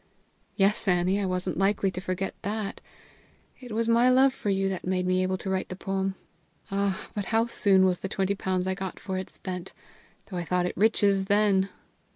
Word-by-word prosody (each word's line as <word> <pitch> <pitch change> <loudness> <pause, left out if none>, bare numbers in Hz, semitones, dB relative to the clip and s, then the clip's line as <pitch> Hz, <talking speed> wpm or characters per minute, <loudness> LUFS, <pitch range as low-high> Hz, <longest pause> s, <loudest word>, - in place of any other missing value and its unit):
"Yes, 200 +2 +2
Annie; 180 +2 +2
I 195 - 0
wasn't 185 0 -2
likely 195 0 +2
to 185 - -6
forget 185 +1 -3
that; 210 0 -3 0.8
it 250 -2 -10
was 225 +1 0
my 235 +2 +5
love 260 +1 +5
for 210 - -4
you 195 0 +1
that 190 -2 -3
made 185 -1 0
me 185 0 +2
able 185 0 0
to 195 - -8
write 190 0 -1
the 185 - -5
poem. 195 0 -2 0.6
Ah, 200 -1 -1
but 205 -2 -3
how 225 +2 +2
soon 195 -5 +4
was 180 -2 +1
the 195 - -4
twenty 195 +1 0
pounds 185 -2 -1
I 190 - 0
got 190 -1 -5
for 190 -1 -3
it 190 - -6
spent, 180 -2 -6 0.5
though 185 - -6
I 175 - -2
thought 180 +1 0
it 180 - -2
riches 200 -2 +3
then!" 200 -1 +3
195 Hz, 200 wpm, -27 LUFS, 185-205 Hz, 0.8 s, my